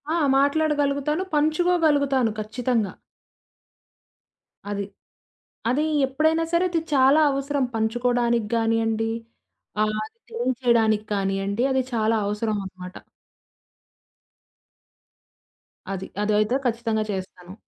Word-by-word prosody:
ఆ! - - +1 0.2
మాట్లాడగలుగుతాను. 290 +2 +1
పంచుకోగలుగుతాను 300 -5 +2
ఖచ్చితంగా. 225 -2 -1 1.8
అది. 200 0 -2 0.9
అది 275 +5 +1 0.2
ఎప్పుడైనా 315 +4 +1
సరే 340 +2 +3
అది 340 -2 0
చాలా 275 +3 +5
అవసరం 275 0 -1
పంచుకోవడానికి 235 0 +1
గానియండి, 225 0 +1 0.7
ఆహ్, 215 0 0
అది 455 - -17
తెలియచేయడానికి 235 - +1
కానియండి. 195 +2 -1
అది 265 0 +2
చాలా 220 0 +2
అవసరమనమాట. 200 -3 -4 3.0
అది. 190 0 -5 0.2
అదైతే 215 +3 +2
ఖచ్చితంగా 230 -2 0
చేస్తాను. 185 -1 -7
235 Hz, 80 wpm, -24 LUFS, 215-285 Hz, 3.0 s, చాలా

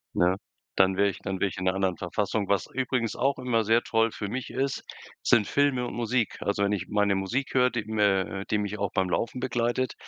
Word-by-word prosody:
Na? 90 +2 +3 0.4
Dann 95 0 +4
wäre 100 +1 +4
ich - - -8
dann 95 -2 -4
wäre 100 - +2
ich - - -9
in 95 - -3
'ner 95 0 +2
anderen 95 -2 0
Verfassung. 100 +3 -1
Was 100 -1 +1
übrigens 130 -3 -1
auch 135 +2 +1
immer 120 -3 +1
sehr 115 +3 +3
toll 115 0 +1
für 100 - -5
mich 125 +4 -4
ist, 135 0 -2 0.4
sind 105 -3 +4
Filme 140 -4 +1
und - - -5
Musik. 120 -1 0
Also 100 0 0
wenn 100 - +2
ich 95 -3 -2
meine 105 -1 +2
Musik 115 +8 -2
höre, 125 -1 +4
die 115 -4 -3
mir 105 -3 +2 0.2
äh, - - -5
die - - +3
mich 105 0 -3
auch 100 -1 -1
beim 95 -1 +1
Laufen 115 +6 -1
begleitet, 125 0 0
105 Hz, 230 wpm, -27 LUFS, 100-125 Hz, 0.4 s, Dann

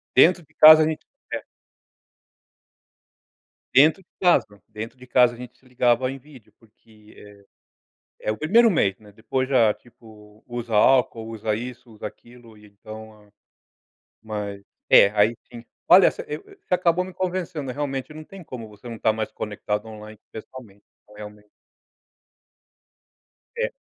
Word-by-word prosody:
Dentro 175 +6 +5
de - - -32
casa 155 0 +9
a - - +2
gente 160 -1 -5 0.3
é. - - -3 2.3
Dentro 155 +8 +5
de - - -55
casa, 105 - +2
dentro 115 +4 -8
de 125 - -15
casa 125 -1 +4
a - - -12
gente 125 0 -11
se - - -30
ligava 125 0 +1
em 135 - -7
vídeo, 125 -7 -18
porque, 110 -1 -22
eh, 100 -1 -16 0.8
é - - -1
o 110 - -5
1º 225 +8 +4
mês, 100 - +1
né, 105 -1 -18
depois 120 +5 -3
já, 120 -5 +4
tipo, 110 -3 -19
usa 120 -1 -6
álcool, 115 0 +3
usa 110 -1 -3
isso, 120 +1 -8
usa 105 -1 -7
aquilo 120 +1 -17
e 105 - -18
então 110 +1 -12
a - - -29 0.9
mas 105 -2 -6 0.3
é 100 - +7
aí 105 +2 +2 0.2
sim 120 -1 -10 0.2
olha, 185 +1 +7
você - - -8 0.5
acabou 180 -1 +2
me 185 - -9
convencendo, 180 -6 -4
realmente 140 +1 -4
não 155 - -10
tem 195 +3 -13
como 125 -7 -9
você 105 +2 -14
não 115 - -6
estar 110 0 +1
mais 110 0 -4
conectado 105 0 -4
online, 110 -1 -11
pessoalmente, 110 -3 -12 0.2
então 105 - -21
realmente. 105 0 -12 2.1
É. - - -1
115 Hz, 150 wpm, -23 LUFS, 105-135 Hz, 2.3 s, casa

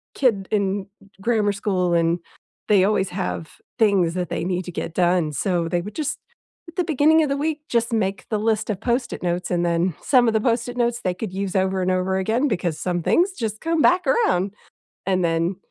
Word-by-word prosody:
kid 210 -8 +1
in 200 -1 0 0.3
grammar 215 -2 +2
school, 185 -3 0
and 170 0 +2 0.5
they 200 -3 +5
always 195 -2 +1
have 180 -3 -4 0.2
things 195 -6 +3
that 180 -3 -2
they - - -2
need 180 0 -2
to 180 - -6
get 165 - -5
done- 175 -3 +2
so 175 +1 0
they 175 +1 0
would 210 +4 -8
just 305 -1 -2 0.5
at 335 - -15
the 360 - +2
beginning 315 +1 +4
of - - 0
the 275 - +1
week, 305 +1 -1
just 235 0 +1
make 195 -3 -1
the 215 - 0
list 220 0 0
of 200 -3 -2
Post-it 240 +2 -1
notes 175 +1 -2
and 175 -1 +1
then 170 +1 +1
some 250 -3 +4
of 225 - +2
the 220 - +3
Post-it 240 +1 0
notes 240 -1 0
they 185 - 0
could 185 +1 -6
use 195 0 -3
over 190 0 +1
and 185 0 +1
over 185 +1 0
again 225 +9 +1
because 175 - -2
some 175 -2 -2
things 340 - +3
just 220 - -4
come 330 -1 +1
back 360 +3 +4
around, 420 - +2 0.5
and 185 -2 +1
then 165 +2 0
195 Hz, 210 wpm, -22 LUFS, 180-235 Hz, 0.5 s, they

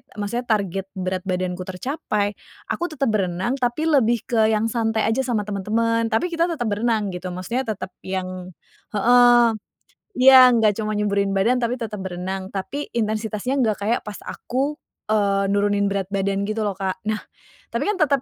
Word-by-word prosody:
maksudnya 210 +4 -3
target 195 -4 0
berat 185 0 -3
badanku 180 -1 -2
tercapai, 205 - -2 0.4
aku - - -2
tetap 275 -4 0
berenang, 190 +6 -1
tapi 245 +5 0
lebih 240 -6 +3
ke 220 -2 +2
yang 220 +1 +1
santai 225 -2 0
aja 225 - 0
sama 225 -5 0
temen-temen, 225 +3 0
tapi 345 +11 +1
kita 335 0 +2
tetap 305 -9 -2
berenang 210 -1 0
gitu, 180 +1 -6
maksudnya 235 +8 -3
tetep 205 -3 -4
yang 185 -1 -5 0.4
heeh, 240 +2 +6 0.7
iya, 265 -1 +7 0.2
nggak 220 -2 +4
cuman 215 -1 -2
nyuburin 200 -1 +1
badan, 230 +6 +2
tapi 240 0 0
tetap 225 -4 -5
berenang. 190 0 -4
Tapi 275 +10 -4
intensitasnya 220 +3 -1
nggak 220 -4 +2
kayak 235 +3 +1
pas 210 -2 -6
aku, 275 +4 -3 0.4
eee, 200 -2 +2
nurunin 205 0 +2
berat 195 -2 -2
badan 195 0 0
gitu 215 +1 -2
loh, 205 - 0
Kak. 190 -1 -3
Nah, 215 - +1 0.6
tapi - - -1
kan 420 - +1
tetap, 280 -4 +3
215 Hz, 165 wpm, -22 LUFS, 195-240 Hz, 0.7 s, iya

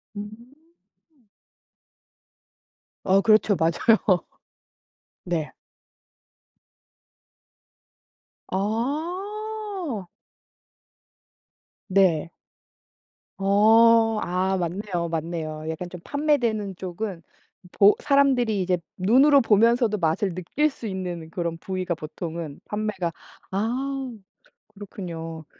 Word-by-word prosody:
으음. 205 0 -5 2.8
어 190 +1 +4
그렇죠. 215 -1 +4
맞아요. 180 +3 +2 1.0
네. 170 -4 -2 3.0
아. 340 - -3 1.8
네. 185 -5 +2 1.1
어. 225 +3 +5
아 185 +2 0
맞네요 175 0 -2
맞네요. 160 -1 -4
약간 175 +3 -5
좀 180 -1 -9
판매되는 240 -10 0
쪽은 185 0 -5 0.5
보 200 +1 +5
사람들이 260 -7 +2
이제 180 0 +1 0.2
눈으로 270 +9 +5
보면서도 230 0 +3
맛을 170 +1 0
느낄 265 - 0
수 265 - -11
있는 180 -4 -5
그런 170 -1 -3
부위가 185 0 -3
보통은 160 -1 -6
판매가 210 -5 -2 0.4
아 255 +6 -2 0.6
그렇군요. 165 -6 -7
200 Hz, 155 characters per minute, -24 LUFS, 175-230 Hz, 3.0 s, 어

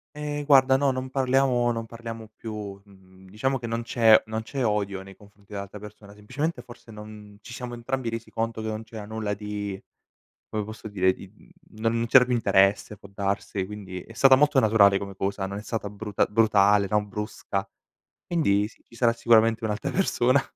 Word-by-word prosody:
Ehm, 150 0 -4
guarda 135 -2 +5
no, 135 0 +2
non 130 0 -4
parliamo 130 -2 +2
non 115 -1 -3
parliamo 115 -1 -8
più. 105 -3 -7
Mhmm, 95 -1 -19
diciamo 130 +7 -1
che 120 - -8
non 115 0 -2
c'è 115 -2 +5
non 110 0 -3
c'è 130 +3 -3
odio 100 -3 -1
nei 95 0 -13
confronti 100 +1 -18
dell'altra 100 +1 -6
persona, 105 0 -12
semplicemente 130 +11 -4
forse 120 -1 -14
non 105 -1 -11
ci 115 +3 -11
siamo 120 0 -6
entrambi 120 0 -3
resi 115 0 -6
conto 115 0 -3
che 110 - -4
non 110 0 -4
c'era 110 -2 -9
nulla 110 -1 -3
di 105 -1 -5 0.7
come 110 -1 -3
posso 110 +1 -9
dire, 95 -2 +2
di, 95 - -12 0.5
uhm - - -11
non 115 +1 +1
c'era 125 +1 +7
più 125 0 -1
interesse 100 -1 +2
può 100 0 -15
darsi, 100 +1 -2
e 95 - 0
quindi 95 -3 -7
è 115 - -14
stata 135 +3 +6
molto 150 +1 +3
naturale 105 -4 +5
come 100 -1 -7
cosa, 95 0 -2
non 100 +1 -5
è 105 - -7
stata 110 -2 -4
bruta 105 +1 -1
brutale, 105 -2 +4
no, 105 0 +2
brusca. 100 -1 -4 0.6
Quindi 105 - +1
sì, 110 - -20
ci - - -17
sarà 115 -1 +3
sicuramente 115 -1 +3
un'altra 105 -1 -2
persona. 135 -8 +2
110 Hz, 195 wpm, -25 LUFS, 100-120 Hz, 0.7 s, c'era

